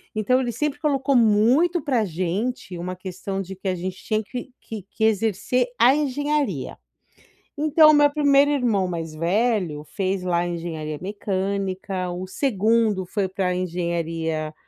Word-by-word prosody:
Então 235 +4 +2
ele 245 -2 -2
sempre 290 +5 -2
colocou 280 -2 +1
muito 245 - +4
pra 255 -6 +1
gente 185 +4 -3
uma 180 +2 -4
questão 190 +1 -5
de 190 0 -7
que 190 +1 -7
a 185 - +1
gente 185 +1 -5
tinha 215 0 -2
que 245 +4 -7
que 220 -2 -7
que 205 +3 -6
exercer 220 +3 +1
a 240 +3 +6
engenharia. 290 - -1 0.8
Então 310 +1 +6
o - - +5
meu 290 0 +6
primeiro 285 -1 +4
irmão 235 -9 +1
mais 165 -3 -5
velho 180 -2 0
fez 190 +3 -2
lá 175 -1 0
engenharia 165 -3 -4
mecânica, 195 -1 -2
o 180 +1 -5
segundo 220 -3 +1
foi 195 +1 -2
pra 185 -1 -1
engenharia 165 -3 -2
200 Hz, 145 wpm, -23 LUFS, 180-250 Hz, 0.8 s, a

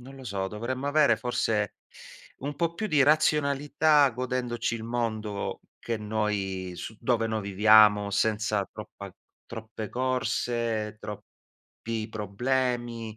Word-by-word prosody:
non 135 +2 -12
lo 135 - -11
so, 100 -4 -2
dovremmo 120 +6 -4
avere 145 0 +4
forse 110 -4 -1 0.6
un 145 +1 -5
po' 170 +1 0
più 215 +6 -3
di 150 -8 +4
razionalità, 150 0 +3
godendoci 125 -1 -2
il 110 - -8
mondo 110 -3 -3 0.2
che 115 -1 -3
noi 105 -4 -2
su 110 +5 -7
dove 115 -3 +1
noi 110 -1 -2
viviamo, 105 +1 +5
senza 105 -1 +1
troppa - - -9 0.3
troppe 110 -2 -7
corse, 120 -4 -1
troppi 110 +1 -8
problemi, 115 +1 -2
115 Hz, 120 wpm, -27 LUFS, 105-130 Hz, 0.6 s, viviamo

